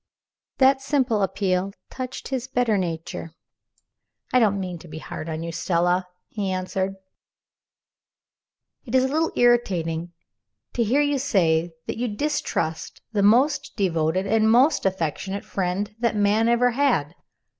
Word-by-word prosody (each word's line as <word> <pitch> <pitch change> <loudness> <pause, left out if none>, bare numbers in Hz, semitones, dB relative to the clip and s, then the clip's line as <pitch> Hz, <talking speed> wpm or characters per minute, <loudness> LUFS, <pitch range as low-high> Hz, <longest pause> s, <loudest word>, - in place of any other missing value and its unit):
That 265 0 +4
simple 265 -6 +1
appeal 195 -1 0 0.2
touched 255 0 -6
his 260 -2 -3
better 245 -4 +1
nature. 165 -2 -4 1.0
"I 255 - +6
don't 205 -4 +2
mean 180 -3 -5
to 175 - -13
be 155 0 -8
hard 155 0 -7
on 160 0 -4
you, 170 - -4
Stella," 175 +2 +1 0.2
he 205 -3 -3
answered. 185 +1 -2 1.9
"It 250 0 -4
is 260 - +5
a - - +2
little 315 +4 0
irritating 175 -9 +1 0.6
to 235 - +1
hear 250 +7 +2
you 290 -1 +1
say 175 - +1
that - - -4
you 245 - 0
distrust 210 - -2
the 210 -3 0
most 270 +7 +3
devoted 175 -2 0
and 220 +2 +3
most 250 +1 +4
affectionate 190 +2 -3
friend 195 +3 -2
that 235 -1 +1
man 210 +2 +3
ever 245 +1 +3
had. 240 - +1
205 Hz, 140 wpm, -24 LUFS, 180-245 Hz, 1.9 s, I